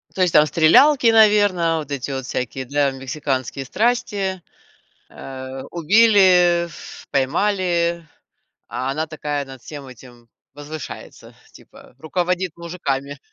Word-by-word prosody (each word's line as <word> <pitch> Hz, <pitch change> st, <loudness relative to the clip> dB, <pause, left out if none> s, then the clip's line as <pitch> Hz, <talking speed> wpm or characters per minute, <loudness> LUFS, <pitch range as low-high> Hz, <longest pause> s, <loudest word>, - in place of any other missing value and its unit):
То 190 Hz, -, -2 dB
есть 180 Hz, -2 st, +2 dB
там 150 Hz, 0 st, +6 dB
стрелялки, 230 Hz, -, +4 dB
наверное, 205 Hz, -7 st, +4 dB
вот 150 Hz, -3 st, -6 dB
эти 140 Hz, 0 st, -4 dB
вот 130 Hz, -1 st, -4 dB
всякие 130 Hz, +1 st, -4 dB
для 140 Hz, +1 st, 0 dB
мексиканские 135 Hz, -1 st, -4 dB
страсти. 200 Hz, -, -1 dB, 0.7 s
Э, 130 Hz, 0 st, -8 dB
убили, 180 Hz, -1 st, +4 dB
ф 170 Hz, -, -12 dB
поймали, 170 Hz, +3 st, 0 dB, 0.6 s
а 130 Hz, +2 st, -3 dB
она 155 Hz, +3 st, -2 dB
такая 150 Hz, -2 st, -4 dB
над 135 Hz, -2 st, -12 dB
всем 145 Hz, -3 st, -9 dB
этим 120 Hz, -2 st, -15 dB, 0.3 s
возвышается, 145 Hz, +1 st, -10 dB, 0.2 s
типа, -, -, -17 dB
руководит 180 Hz, +2 st, -2 dB
мужиками. 145 Hz, -5 st, -4 dB
155 Hz, 115 wpm, -20 LUFS, 135-180 Hz, 0.7 s, там